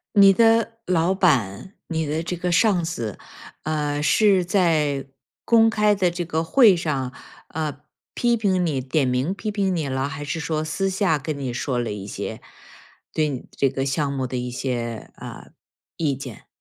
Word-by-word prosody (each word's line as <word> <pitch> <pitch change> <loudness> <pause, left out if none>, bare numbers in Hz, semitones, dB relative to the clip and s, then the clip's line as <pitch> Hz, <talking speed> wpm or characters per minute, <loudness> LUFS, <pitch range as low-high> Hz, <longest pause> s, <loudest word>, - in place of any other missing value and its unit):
你 195 -1 +8
的 225 +1 +3
老 180 0 +2
板， 155 - +1
你 160 -2 -1
的 155 +2 -2
这 180 +2 -3
个 180 +1 -2
上 180 0 +3
司， 115 - -4 0.5
呃， 150 -1 -1
是 195 +3 +4
在 160 -7 +1 0.4
公 225 -1 +5
开 210 -1 +3
的 190 -3 +2
这 175 0 -4
个 160 -1 -1
会 215 +3 +6
上， 140 -7 -2 0.4
呃， 150 -3 -4 0.3
批 240 -1 +2
评 190 -5 +1
你 145 -5 -1
点 135 +2 0
名 125 +8 0
批 210 +2 -4
评 195 -3 0
你 160 -4 -1
了？ 130 0 -1
还 140 +1 -6
是 145 +3 -3
说 155 -1 -1
私 195 +5 -1
下 190 -5 +1
跟 150 +1 -4
你 130 -3 -3
说 125 +1 -2
了 120 -2 -1
一 100 -1 -6
些 - - -5 0.7
对 155 -1 +1
你 130 -3 -6
这 135 - +1
个 135 +1 -2
项 140 +1 0
目 135 -2 -2
的 125 0 -4
一 125 0 -3
些， 120 -3 -4
呃， - - -10 0.5
意 150 -4 0
见？ 130 -4 -9
155 Hz, 190 characters per minute, -23 LUFS, 135-185 Hz, 0.7 s, 你